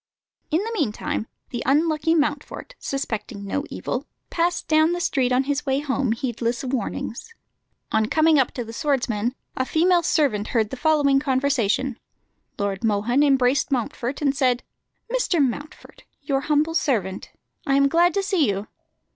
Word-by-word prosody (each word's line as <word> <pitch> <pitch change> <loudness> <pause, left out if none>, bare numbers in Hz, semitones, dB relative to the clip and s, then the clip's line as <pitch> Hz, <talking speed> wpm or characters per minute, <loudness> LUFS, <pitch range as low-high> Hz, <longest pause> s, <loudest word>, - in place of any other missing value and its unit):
In 325 +6 +1
the 455 - -4
meantime 230 - -2 0.2
the 240 - -3
unlucky 310 +3 +2
Mountfort, 295 - -2
suspecting 220 -6 -4
no 280 +9 -2
evil, 265 +4 -4 0.2
passed 345 +1 0
down 315 +2 +4
the 350 - -2
street 260 -7 +1
on 250 +1 +3
his 285 +1 -1
way 270 -1 0
home, 275 -4 -1
heedless 235 -1 -2
of 260 0 -4
warnings. 240 - -4 0.6
On 220 0 +2
coming 315 +3 +4
up 260 - +2
to 245 - -3
the 225 0 -9
swordsmen, 245 -5 0 0.2
a 260 - 0
female 345 +6 +3
servant 275 -11 +1
heard 220 -3 0
the - - -3
following 290 -1 +3
conversation: 265 -3 0 0.6
Lord 200 -1 -2
Mohun 225 +5 +2
embraced 270 -2 +3
Mountfort, 250 +2 -2
and 280 -1 +2
said 255 -2 +1 0.5
"Mr. 485 -9 +1
Mountfort, 285 +2 -3 0.2
your 275 -1 0
humble 300 +2 +1
servant. 220 - -1 0.4
I 275 - +3
am 275 0 +5
glad 345 +5 +3
to 395 - +1
see 375 - +2
you." 200 +1 -2
275 Hz, 155 wpm, -23 LUFS, 240-305 Hz, 0.6 s, am